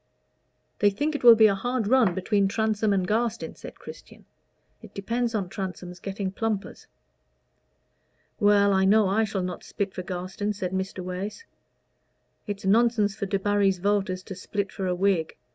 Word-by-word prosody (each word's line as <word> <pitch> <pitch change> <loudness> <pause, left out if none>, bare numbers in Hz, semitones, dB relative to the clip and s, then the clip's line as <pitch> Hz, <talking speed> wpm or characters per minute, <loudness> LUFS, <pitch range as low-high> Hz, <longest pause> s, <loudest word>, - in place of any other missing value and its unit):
"They 205 - +5
think 290 +10 -2
it 290 - -4
will 235 -1 +10
be 220 0 +6
a 205 - +5
hard 245 +4 -2
run 225 -5 +3
between 200 +1 +1
Transome 220 0 0
and 190 -2 +1
Garstin," 230 +2 -1
said - - -11
Christian. - - -13 0.6
"It - - -14
depends 235 +4 -2
on 200 -4 -1
Transome's 180 -2 -6
getting 195 0 -4
plumpers." 215 0 -4 1.5
"Well, 205 -1 +4
I 190 0 +3
know 205 +1 +4
I 215 +4 +2
shall 195 -3 -3
not 180 -1 -5
split 195 -1 -4
for - - -5
Garstin," 185 +3 -4
said 185 -3 -4
Mr. 190 0 -3
Wace. 190 - -6 1.0
"It's 205 -1 -5
nonsense 215 0 +3
for 200 - -4
Debarry's 195 0 +1
voters 190 -1 -1
to 190 - -8
split 200 +1 -4
for 190 - -4
a 180 - 0
Whig. 180 -4 0
200 Hz, 160 wpm, -26 LUFS, 190-215 Hz, 1.5 s, will